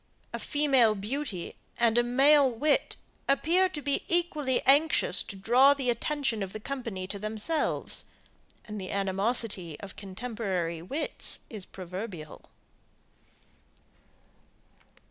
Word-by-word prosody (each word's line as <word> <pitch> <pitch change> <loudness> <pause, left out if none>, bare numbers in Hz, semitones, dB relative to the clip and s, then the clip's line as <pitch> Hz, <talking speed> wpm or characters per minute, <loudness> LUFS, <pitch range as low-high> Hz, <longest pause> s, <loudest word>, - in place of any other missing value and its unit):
A - - -3
female 270 -7 +3
beauty 210 -2 -4 0.2
and 230 -1 +3
a 240 - +5
male 270 +3 +5
wit, 280 +5 0 0.3
appear 340 +7 +3
to 300 -5 -6
be 285 -1 0
equally 305 -7 +1
anxious 315 - +4
to 200 - -7
draw 250 +8 +5
the 260 -3 0
attention 255 -2 -1
of 195 -1 -4
the 215 - -5
company 230 -7 -5
to 200 +1 -6
themselves; 215 +10 -1 0.6
and 210 -2 -6
the 185 - -6
animosity 195 -3 -1
of 200 -2 -9
contemporary 190 -5 -3
wits 275 - -1
is 210 -5 -5
proverbial. 180 -3 -8
235 Hz, 115 wpm, -29 LUFS, 195-280 Hz, 0.6 s, a